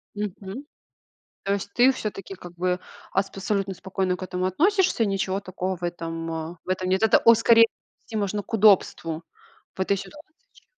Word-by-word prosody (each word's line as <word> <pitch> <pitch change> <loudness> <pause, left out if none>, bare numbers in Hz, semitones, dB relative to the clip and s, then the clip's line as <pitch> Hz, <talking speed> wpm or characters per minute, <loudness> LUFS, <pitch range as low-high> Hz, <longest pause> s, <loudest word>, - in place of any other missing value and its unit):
Мгм. 205 +4 -5 0.8
То 200 - 0
есть, 200 0 -3
ты 250 +2 +6
всё-таки 200 -5 -6
как 175 -1 -11
бы 180 +1 -1 0.3
абсолютно 195 0 -1
спокойно 185 0 -2
к - - -7
этому 185 0 -2
относишься, 345 - +2
ничего 195 -1 -1
такого 185 -1 -4
в 175 - -14
этом 165 -1 -4
в - - -10
этом 185 0 -1
нет. 190 +2 +2
Это, 220 - +6
о, 230 - +7
скорее 230 0 +6 0.4
нести 225 - -9
можно 205 0 -1
к - - -16
удобству 185 -6 +3 0.5
в - - -21
этой 200 +1 +2
ситуации 300 - -11 0.2
еще. - - -22
195 Hz, 165 wpm, -25 LUFS, 180-215 Hz, 0.8 s, о